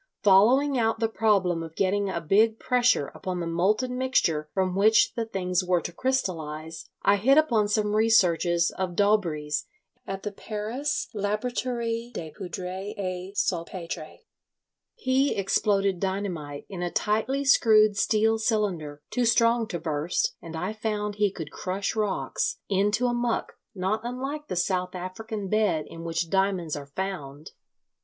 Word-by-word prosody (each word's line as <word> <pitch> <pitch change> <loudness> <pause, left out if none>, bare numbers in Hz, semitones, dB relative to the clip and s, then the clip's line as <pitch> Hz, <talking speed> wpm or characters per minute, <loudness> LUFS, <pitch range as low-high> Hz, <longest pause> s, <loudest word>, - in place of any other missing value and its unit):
Following 245 +8 +5
out 225 -1 +1
the 225 - +2
problem 200 -6 +1
of 165 -1 -8
getting 200 +1 +1
a 180 - -2
big 215 +7 +3
pressure 245 - +2
upon 185 -1 -4
the 170 - -2
molten 210 +10 0
mixture 165 -12 +1
from 190 -1 0
which 215 +3 +4
the 230 -1 -3
things 185 -3 -1
were 180 -1 +2
to 170 - -6
crystallise, 165 -10 -3
I 205 - +4
hit 265 +8 +4
upon 235 -9 +3
some 210 0 0
researches 175 -6 +3
of 185 -2 -4
Daubree's 170 -8 +1 0.4
at 195 0 -5
the 210 - -3
Paris 220 +7 -3
Laboratorie 230 +2 -2
des 160 -2 -5
Poudres 185 +4 -6
et 185 0 -5
Salpetres. 170 -3 -3 0.7
He 265 +2 +1
exploded 195 -1 +1
dynamite 180 -7 -3
in 190 -3 -7
a 175 - -1
tightly 220 +9 0
screwed 215 -5 +5
steel 220 +2 +2
cylinder, 180 -10 -1
too 250 -1 +1
strong 230 0 +3
to 175 - -3
burst, 155 +1 -1
and 165 -1 -8
I 180 +6 -3
found 210 -1 -3
he 205 -1 +3
could 160 -5 -8
crush 190 +4 -3
rocks 210 -3 -1
into 205 +4 +2
a 245 - +1
muck 240 -1 -1 0.2
not 190 +3 0
unlike 270 +5 -4
the - - -3
South 180 +1 -1
African 200 +3 -5
bed 195 -7 +1
in 165 - -9
which 165 0 -2
diamonds 190 -5 +1
are 145 -1 -7
found. 150 -3 -5
200 Hz, 150 wpm, -26 LUFS, 175-225 Hz, 0.7 s, Following